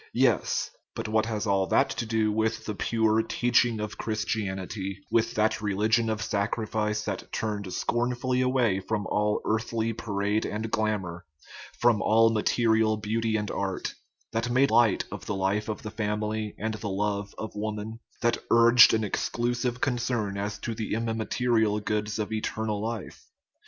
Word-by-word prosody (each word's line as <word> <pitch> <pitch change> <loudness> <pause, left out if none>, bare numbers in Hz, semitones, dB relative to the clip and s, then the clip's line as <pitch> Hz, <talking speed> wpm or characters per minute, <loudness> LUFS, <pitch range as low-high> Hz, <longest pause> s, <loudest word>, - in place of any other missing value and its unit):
Yes; - - +2 0.2
but - - -4
what 110 0 +1
has 110 -1 -2
all 100 -2 +2
that - - +3
to 115 -1 -3
do 110 -1 +1
with 110 +1 -1
the 105 - -3
pure 110 +1 +2
teaching 120 0 +2
of 105 0 -5
Christianity 100 -3 -3
with 115 0 +2
that 110 0 +1
religion 110 +3 +2
of 110 -1 -1
sacrifice 105 0 -1
that 115 - -4
turned 105 -3 -3
scornfully 125 +5 0
away 125 -6 +2
from 105 +1 -2
all 105 +1 0
earthly 110 +1 0
parade 105 -1 -1
and 110 +1 -3
glamour, 100 -6 -1 0.5
from 120 -3 +4
all 115 +1 +5
material 110 0 +2
beauty 110 +1 -1
and 105 -1 -3
art; 95 -1 -3 0.4
that 115 +2 -1
made 130 +2 +3
light 115 -3 +4
of - - -7
the 100 - -1
life 95 +3 0
of 110 - -4
the 110 - -5
fam 105 -1 -2
ily 110 0 -3
and 110 +1 -2
the 110 -1 -4
love 100 +1 -2
of 110 - -5
woman; 105 +1 -4 0.2
that 120 - +2
urged 120 0 +7
an 110 - 0
exclusive 120 +4 -1
con 130 -3 +1
cern 115 -4 -1
as 100 +1 -3
to 115 - -4
the 110 -1 -3
immaterial 115 -1 +1
goods 105 0 -2
of 110 0 -3
eternal 110 -1 -2
life? 115 -2 -5
110 Hz, 160 wpm, -27 LUFS, 105-115 Hz, 0.5 s, urged